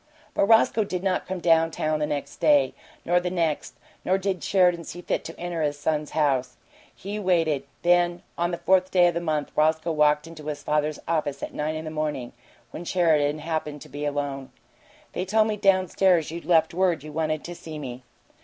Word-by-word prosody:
But -, -, +2 dB
Roscoe 225 Hz, 0 st, +4 dB
did 185 Hz, -2 st, -4 dB
not 190 Hz, -2 st, 0 dB
come 190 Hz, 0 st, -3 dB
down 165 Hz, -1 st, +4 dB
town 155 Hz, -1 st, -1 dB
the 150 Hz, -, 0 dB
next 145 Hz, -1 st, -4 dB
day, 145 Hz, -4 st, +4 dB, 0.3 s
nor 175 Hz, +1 st, +3 dB
the 180 Hz, 0 st, -2 dB
next; 165 Hz, -4 st, -1 dB, 0.3 s
nor 190 Hz, -, +2 dB
did 190 Hz, -4 st, -2 dB
Sheridan 180 Hz, -2 st, +3 dB
see 175 Hz, +2 st, -8 dB
fit -, -, -1 dB
to -, -, -9 dB
enter 175 Hz, -1 st, -3 dB
his 145 Hz, -1 st, 0 dB
son's 150 Hz, 0 st, -1 dB
house. 130 Hz, -4 st, +1 dB, 0.4 s
He 205 Hz, +3 st, -5 dB
waited. 165 Hz, -8 st, +1 dB, 0.2 s
Then, 175 Hz, 0 st, +3 dB
on 175 Hz, 0 st, 0 dB
the 175 Hz, -, -3 dB
fourth 185 Hz, 0 st, +2 dB
day 180 Hz, -2 st, +5 dB
of -, -, -3 dB
the 170 Hz, -, -2 dB
month, 155 Hz, -3 st, -2 dB
Roscoe 160 Hz, +2 st, +2 dB
walked 150 Hz, -1 st, +3 dB
into 160 Hz, -2 st, -10 dB
his 150 Hz, -1 st, -4 dB
father's 150 Hz, 0 st, 0 dB
office 150 Hz, -4 st, -1 dB
at -, -, -5 dB
nine 155 Hz, +1 st, -2 dB
in 155 Hz, +1 st, -5 dB
the 155 Hz, -, -5 dB
morning, 150 Hz, -5 st, -3 dB, 0.4 s
when 170 Hz, -, -7 dB
Sheridan 155 Hz, -5 st, +2 dB
happened 155 Hz, -2 st, -4 dB
to 155 Hz, -, -15 dB
be 145 Hz, +2 st, -6 dB
alone. 140 Hz, -2 st, -3 dB, 0.6 s
"They 180 Hz, -, -2 dB
told 215 Hz, +3 st, +3 dB
me 215 Hz, -, -1 dB
down 195 Hz, -2 st, +3 dB
stairs 175 Hz, -3 st, +2 dB
you'd 170 Hz, +1 st, -7 dB
left 160 Hz, -2 st, +3 dB
word 175 Hz, -4 st, +1 dB
you 155 Hz, -, -8 dB
wanted 155 Hz, 0 st, -1 dB
to 175 Hz, -, -6 dB
see 160 Hz, -2 st, -9 dB
me." 130 Hz, -4 st, -7 dB
160 Hz, 205 wpm, -25 LUFS, 150-175 Hz, 0.6 s, day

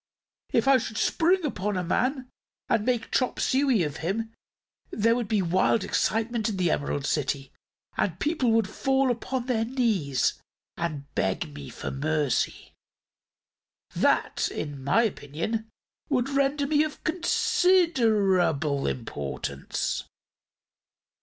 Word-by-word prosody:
If -, -, +2 dB
I 270 Hz, -1 st, +6 dB
should 220 Hz, -2 st, -5 dB
spring 350 Hz, +6 st, +2 dB
upon 205 Hz, -7 st, -2 dB
a 180 Hz, -, -1 dB
man 255 Hz, -, 0 dB, 0.4 s
and 215 Hz, -, +2 dB
make 245 Hz, -1 st, -1 dB
chop 255 Hz, -, 0 dB
suey 260 Hz, -7 st, +2 dB
of 150 Hz, -1 st, -3 dB
him, 220 Hz, +8 st, -2 dB, 0.6 s
there 230 Hz, +2 st, +2 dB
would 240 Hz, -3 st, -2 dB
be 210 Hz, -3 st, +1 dB
wild 185 Hz, +4 st, +2 dB
excitement 225 Hz, +2 st, 0 dB
in 205 Hz, -, -3 dB
the 175 Hz, -3 st, +2 dB
Emerald 145 Hz, -1 st, -1 dB
City 140 Hz, -2 st, -1 dB, 0.5 s
and 180 Hz, -, +1 dB
the -, -, -20 dB
people 295 Hz, -, 0 dB
would 225 Hz, -3 st, +3 dB
fall 270 Hz, +4 st, +1 dB
upon 245 Hz, +1 st, -3 dB
their 240 Hz, -3 st, +1 dB
knees 220 Hz, -, 0 dB, 0.3 s
and 150 Hz, -4 st, -3 dB
beg 95 Hz, -6 st, -1 dB
me 70 Hz, -1 st, -8 dB
for -, -, -6 dB
mercy. 150 Hz, -1 st, -1 dB, 1.2 s
That, -, -, +2 dB
in 145 Hz, -3 st, -5 dB
my 145 Hz, -, +3 dB
opinion, 215 Hz, +4 st, -3 dB, 0.4 s
would 260 Hz, -2 st, +1 dB
render 280 Hz, +1 st, +1 dB
me 300 Hz, +1 st, +3 dB
of 310 Hz, -1 st, -6 dB
considerable 220 Hz, -, +2 dB
importance." 70 Hz, -, -3 dB
220 Hz, 125 wpm, -27 LUFS, 155-260 Hz, 1.2 s, I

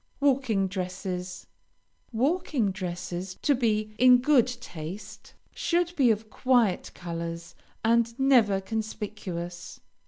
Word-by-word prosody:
WALKING 260 Hz, -8 st, +2 dB
DRESSES 180 Hz, -1 st, -5 dB, 0.7 s
Walking 260 Hz, -, +1 dB
dresses, 180 Hz, -1 st, -5 dB
to 290 Hz, -, +4 dB
be 215 Hz, -4 st, 0 dB
in 250 Hz, 0 st, +8 dB
good 255 Hz, -1 st, +4 dB
taste, 200 Hz, -5 st, -8 dB, 0.2 s
should 350 Hz, 0 st, 0 dB
be 270 Hz, -7 st, +4 dB
of 220 Hz, 0 st, -1 dB
quiet 245 Hz, -7 st, +2 dB
colors, 170 Hz, -1 st, -6 dB, 0.3 s
and 230 Hz, +1 st, +2 dB
never 240 Hz, -8 st, +4 dB
conspicuous. 195 Hz, -5 st, -5 dB
215 Hz, 100 wpm, -27 LUFS, 185-250 Hz, 0.7 s, in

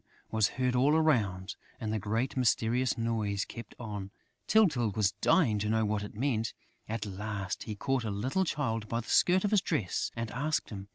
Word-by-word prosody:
was 110 Hz, -2 st, +3 dB
heard 125 Hz, -1 st, +1 dB
all 140 Hz, +5 st, +4 dB
around; 105 Hz, -12 st, +1 dB, 0.2 s
and 110 Hz, -1 st, -2 dB
the 110 Hz, -, 0 dB
great 110 Hz, +6 st, -1 dB
mysterious 125 Hz, 0 st, +2 dB
noise 110 Hz, -4 st, -1 dB
kept 115 Hz, -, -9 dB
on. 105 Hz, -4 st, -5 dB, 0.4 s
Tyltyl 155 Hz, -, +4 dB
was 105 Hz, -3 st, +3 dB
dying 120 Hz, -, +4 dB
to 105 Hz, +1 st, -1 dB
know 110 Hz, 0 st, +2 dB
what 105 Hz, 0 st, 0 dB
it 105 Hz, -, -7 dB
meant. 115 Hz, -2 st, 0 dB, 0.4 s
At 110 Hz, -1 st, -2 dB
last, 100 Hz, -1 st, -4 dB
he 110 Hz, -, -4 dB
caught 135 Hz, +3 st, 0 dB
a 110 Hz, -, -2 dB
little 130 Hz, -, 0 dB
Child 115 Hz, -, -2 dB
by 115 Hz, 0 st, -1 dB
the 115 Hz, -, -12 dB
skirt 185 Hz, +1 st, +4 dB
of 205 Hz, -, +1 dB
his 210 Hz, -3 st, +4 dB
dress 125 Hz, -, -1 dB
and 115 Hz, -1 st, -3 dB
asked 150 Hz, +3 st, -1 dB
him. 100 Hz, -2 st, -7 dB
115 Hz, 190 wpm, -31 LUFS, 105-130 Hz, 0.4 s, all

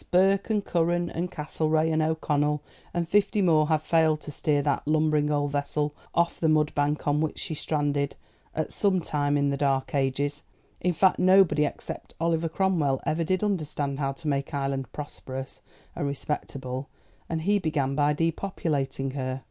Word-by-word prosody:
Burke, 195 Hz, +3 st, +3 dB
and 210 Hz, -2 st, +1 dB
Curran, 175 Hz, 0 st, +1 dB
and 175 Hz, +2 st, -2 dB
Castlereagh, 155 Hz, +1 st, 0 dB
and 155 Hz, -, +2 dB
O'Connell, 150 Hz, -2 st, 0 dB, 0.3 s
and 170 Hz, -1 st, -1 dB
fifty 205 Hz, +3 st, +2 dB
more 160 Hz, -5 st, +4 dB
have 155 Hz, 0 st, +1 dB
failed 160 Hz, -1 st, +3 dB
to 150 Hz, -, -7 dB
steer 145 Hz, 0 st, +1 dB
that 145 Hz, 0 st, 0 dB
lumbering 155 Hz, -1 st, +2 dB
old 145 Hz, -1 st, 0 dB
vessel 145 Hz, +1 st, -1 dB, 0.2 s
off 170 Hz, 0 st, +1 dB
the 160 Hz, -, +2 dB
mudbank 150 Hz, -1 st, +1 dB
on 145 Hz, +1 st, +2 dB
which 155 Hz, -, -1 dB
she -, -, -4 dB
stranded 145 Hz, -2 st, -1 dB, 0.4 s
at 155 Hz, -, -2 dB
some 195 Hz, -3 st, +2 dB
time 145 Hz, -3 st, 0 dB
in 140 Hz, 0 st, +2 dB
the 140 Hz, -, -1 dB
dark 135 Hz, -2 st, 0 dB
ages; 140 Hz, +1 st, 0 dB, 0.4 s
in 180 Hz, -, +1 dB
fact, 190 Hz, +3 st, +3 dB
nobody 185 Hz, -5 st, +5 dB
except -, -, -6 dB
Oliver 165 Hz, 0 st, +1 dB
Cromwell 160 Hz, -7 st, +1 dB
ever 165 Hz, +2 st, +1 dB
did 185 Hz, +4 st, 0 dB
understand 150 Hz, -8 st, -1 dB
how 135 Hz, -1 st, 0 dB
to 155 Hz, +3 st, -9 dB
make 140 Hz, +1 st, -1 dB
Ireland 135 Hz, -1 st, -2 dB
prosperous 135 Hz, -2 st, -7 dB, 0.3 s
and 145 Hz, -, -2 dB
respectable, 135 Hz, -2 st, -4 dB, 0.4 s
and 160 Hz, -1 st, -2 dB
he 205 Hz, +3 st, +3 dB
began 150 Hz, -6 st, 0 dB
by 145 Hz, +1 st, +3 dB
depopulating 150 Hz, -5 st, -1 dB
her. 130 Hz, -1 st, -3 dB
150 Hz, 165 wpm, -27 LUFS, 145-165 Hz, 0.4 s, nobody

